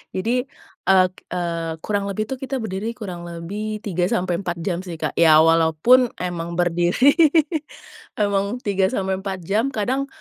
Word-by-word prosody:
Jadi, 245 +7 0 0.4
eee 185 -1 +6 0.3
eee, 170 -2 -2
kurang 205 -1 -1
lebih 200 +2 -2
tuh, 260 - -3
kita 270 +1 -4
berdiri 215 +3 -4
kurang 175 -6 -7
lebih 205 +6 -5
3 180 -3 0
sampai 180 -2 -1
4 175 -3 -3
jam 175 -1 -1
sih 180 -2 -7
Kak, 160 - -3
ya 160 -1 +7
walaupun 165 +10 +4
emang 170 -1 -4
berdiri, 175 +9 +3 1.0
emang 200 +1 0
3 195 -2 +1
sampai 190 -1 -2
4 190 -1 -4
jam. 210 +8 +1
Kadang 260 +6 -1
190 Hz, 155 wpm, -22 LUFS, 175-215 Hz, 1.0 s, ya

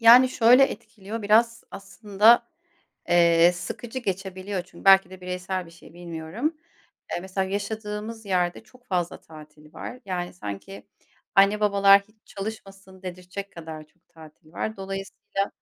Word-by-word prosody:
Yani, 240 +3 +8
şöyle 250 +2 +6
etkiliyor 220 -4 -7
biraz 230 +2 +3
aslında, 210 +4 +3 0.6
eee, 170 0 +5
sıkıcı 225 +8 -6
geçebiliyor. 190 -2 -4
Çünkü 170 - -16
belki 195 -2 +7
de 185 -1 -12
bireysel 180 0 -4
bir 165 - -15
şey, 170 - -16
bilmiyorum. 175 - -4 0.5
Eee, - - -1
mesela 190 0 -3
yaşadığımız 210 +2 -5
yerde 180 0 0
çok 245 +3 -22
fazla 175 -3 -2
tatil 150 -1 -15
var. 250 - -8
Yani, 180 -2 -4
sanki 175 - -8 0.5
anne 200 +2 +5
babalar 200 -1 +6
hiç 215 +2 -27
çalışmasın 195 -2 -9
dedirtecek 185 +2 -7
kadar 160 -2 -8
çok 175 - -38
tatil 155 0 -17
var. 220 +3 -4
Dolayısıyla, 195 0 -4
195 Hz, 135 wpm, -25 LUFS, 175-215 Hz, 0.6 s, Yani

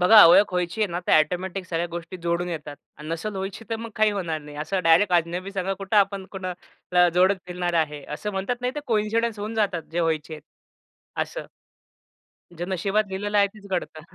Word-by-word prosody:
बघा, 210 +4 +9
ओळख 185 +3 +6
व्हायची 180 +3 -1
आहे 210 - +4
ना, 175 - -2
तर - - +2
ऑटोमॅटिक 185 +3 -1
सगळ्या 170 -1 -1
गोष्टी 170 +2 -6
जोडून 170 +1 0
येतात 150 -3 -6 0.2
आणि 150 +1 -9
नसेल 165 +6 -3
व्हायची, 195 +3 -5
तर 225 - 0
मग 230 0 -7
काही 215 -1 +4
होणार 170 -6 -2
नाही. 145 0 -11
असं 160 +5 -1
डायरेक्ट 170 +4 +5
अजनबी 175 +3 0
संग 190 0 -1
कुठं 195 +2 -1
आपण 200 -1 +3
कुणा 185 -2 -4 0.4
ला 180 0 +6
जोडत 185 +2 +4
फिरणार 175 -1 -2
आहे, 150 -3 0
असं 210 +7 -4
म्हणतात 195 +6 -2
नाही, 250 +1 -2
तर 295 - -3
कोइन्सिडन्स 225 0 0
होऊन 215 +2 -4
जातात 200 -6 0
जे 175 - 0
व्हायचेत, 160 -1 -2 0.7
असं. - - -3 1.1
जे 175 +1 -5
नशिबात 195 +3 +1
लिहिलेलं 205 +2 -1
आहे 200 - +6
तेच 205 -1 -13
घडतं. 175 -3 -3
185 Hz, 195 wpm, -25 LUFS, 170-205 Hz, 1.1 s, बघा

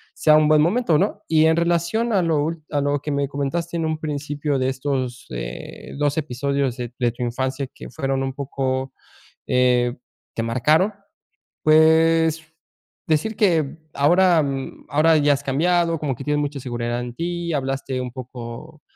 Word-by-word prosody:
sea 155 -1 +5
un 155 - +4
buen 155 -1 +5
momento, 175 -1 +2
¿no? 205 +1 -1
Y 160 -1 +4
en 160 0 +3
relación 170 +7 +1
a 195 - +3
lo 160 -3 +1
úl 160 0 -4
a 145 - +1
lo 145 0 0
que 150 - -4
me 140 0 0
comentaste 165 +5 -3
en 165 - -1
un 155 0 -1
principio 145 -1 -2
de 130 0 +1
estos, 130 -2 -3
eh, - - -7
2 145 0 +1
episodios 140 -2 -1
de 120 -1 -5
de 120 -1 +2
tu 125 +1 -5
infancia 130 +3 -2
que - - -10
fueron 135 +2 -2
un 135 - -2
poco, 130 -1 -3 0.5
eh, 125 -1 +3 0.4
te 115 - -1
marcaron, 150 - +2 0.7
pues, 160 +1 +4 0.6
decir 160 +8 +1
que 165 -8 +1 0.2
ahora, 175 +3 +4
mm, 135 -1 -5
ahora 155 +2 +4
ya 145 -1 +4
has 140 - -2
cambiado, 170 +4 +1
como 145 -3 -1
que 135 - -8
tienes 150 0 +1
mucha 145 -1 -3
seguridad 120 -1 -3
en 120 -1 -7
ti, 170 +1 -3
hablaste 135 -2 -2
un 125 -1 -5
poco 125 +4 -9
145 Hz, 170 wpm, -22 LUFS, 130-160 Hz, 0.7 s, sea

